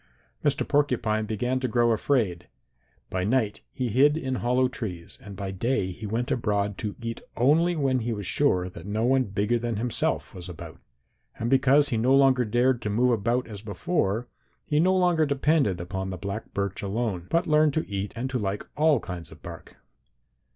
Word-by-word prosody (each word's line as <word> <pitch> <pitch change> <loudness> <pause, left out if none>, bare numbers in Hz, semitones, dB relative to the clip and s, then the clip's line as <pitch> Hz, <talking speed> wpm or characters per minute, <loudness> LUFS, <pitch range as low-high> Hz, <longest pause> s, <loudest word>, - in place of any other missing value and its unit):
Mr. 145 0 +1
Porcupine 120 -7 +1
began 125 +4 -1
to 130 - -1
grow 120 0 +2
afraid. 110 - 0 0.6
By 95 0 -1
night 110 0 0
he 125 -2 -2
hid 140 +7 +4
in 135 -4 -2
hollow 125 +2 +2
trees 95 -9 -6
and 100 -1 -9
by 95 0 -4
day 95 -1 -1
he 105 +4 -7
went 115 +4 -2
abroad 105 -3 0
to 105 -2 -3
eat 115 -1 -5 0.2
only 160 +8 +3
when 135 -4 +1
he 120 0 -2
was 105 -3 -4
sure 90 -7 +2
that 90 0 -10
no 110 +3 0
one 130 +1 +3
bigger 105 +3 0
than 120 -1 -2
himself 115 +3 -1
was 90 0 -8
about. 85 - -9 0.6
And 115 +2 -2
because 135 +2 +4
he 115 - 0
no 125 +4 +4
longer 135 -2 +4
dared 120 +3 +2
to 105 - -2
move 120 +4 +2
about 120 +3 0
as 105 -3 -8
before, 110 - -1 0.4
he 150 -1 +1
no 185 +3 +4
longer 175 -4 +3
depended 140 - +2
upon 95 +2 -4
the 95 - -5
black 100 +4 -5
birch 100 -1 -2
alone, 100 -3 -2
but 170 +1 +2
learned 150 -2 +3
to 155 - -1
eat 100 0 -3
and 120 +3 -2
to 130 - -1
like 100 -1 -3
all 150 -2 +4
kinds 90 -6 -7
of - - -15
bark. - - -10
115 Hz, 190 wpm, -26 LUFS, 100-135 Hz, 0.6 s, hid